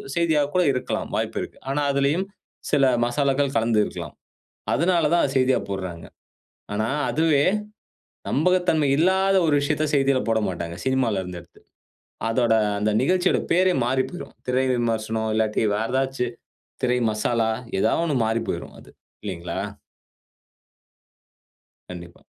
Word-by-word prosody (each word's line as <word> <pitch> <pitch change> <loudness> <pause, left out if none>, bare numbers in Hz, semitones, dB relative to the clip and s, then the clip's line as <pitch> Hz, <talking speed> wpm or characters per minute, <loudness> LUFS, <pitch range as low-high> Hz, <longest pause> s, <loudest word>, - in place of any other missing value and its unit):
செய்தியா 165 -3 +2
கூட 180 - +4
இருக்கலாம், 125 - -3
வாய்ப்பு - - -2
இருக்கு. - - -11
ஆனா 145 +1 0
அதுலயும் 145 +7 +1 0.4
சில 140 -2 +4 0.2
மசாலாக்கள் 140 +2 0
கலந்து 115 -1 +2
இருக்கலாம். - - -6 0.6
அதனாலதான் 170 0 +2
அத 135 - 0
செய்தியா 130 0 +3
போட்றாங்க. 95 -4 -5 0.7
ஆனா, 110 +1 0 0.2
அதுவே. 150 +2 +2 0.9
நம்பகத்தன்மை 165 -1 +2
இல்லாத 190 +4 +3
ஒரு 150 - +2
விஷயத்த 145 +2 0
செய்தில 135 -1 +3
போடமாட்டாங்க. 95 -6 -1
சினிமால 130 -6 +1
இருந்து 90 -1 -7
எடுத்து. - - -20 0.7
அதோட 115 -1 +2 0.3
அந்த 105 +1 +1
நிகழ்ச்சியோட 180 +6 +2
பேரே 185 +1 +4
மாறிப்போய்ரும். 130 +7 -2
திரை 130 +1 +1
விமர்சனம் 110 -2 -1
இல்லாட்டி 110 0 +1
வேற 110 +2 -2
ஏதாச்சு 135 -1 0 0.6
திரை 125 -1 +2
மசாலா 110 +1 0 0.3
ஏதா - - +2
ஒன்னு 150 -4 0
மாறிப்போய்ரும் 115 +1 -3
அது. - - -17 0.3
இல்லீங்களா? 90 -4 -5 2.3
கண்டிப்பா. 85 -1 -10
130 Hz, 120 wpm, -23 LUFS, 110-150 Hz, 2.3 s, கூட